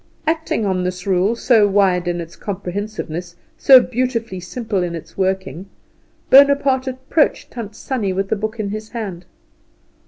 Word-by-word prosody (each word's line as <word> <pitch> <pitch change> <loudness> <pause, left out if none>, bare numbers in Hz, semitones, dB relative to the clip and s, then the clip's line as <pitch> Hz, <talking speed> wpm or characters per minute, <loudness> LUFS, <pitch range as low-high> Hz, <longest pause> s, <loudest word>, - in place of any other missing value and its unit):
Acting 320 -8 -1
on 185 -2 0
this 180 0 -4
rule, 195 +3 +2
so 230 -3 +4
wide 190 -3 +2
in 175 0 -1
its 165 0 -8
comprehensiveness, 185 -3 -5 0.2
so 265 -2 +8
beautifully 240 -5 -2
simple 210 +2 -3
in 175 -1 -2
its 165 0 -10
working, 190 -3 -2 0.6
Bonaparte 275 -1 +5
approached 260 +4 0
Tant 220 -4 -7
Sannie 225 -5 -2
with 195 +1 -2
the - - +1
book 215 +2 -4
in 205 -2 -2
his 215 +1 -6
hand. 195 -7 -6
205 Hz, 150 wpm, -19 LUFS, 180-240 Hz, 0.6 s, so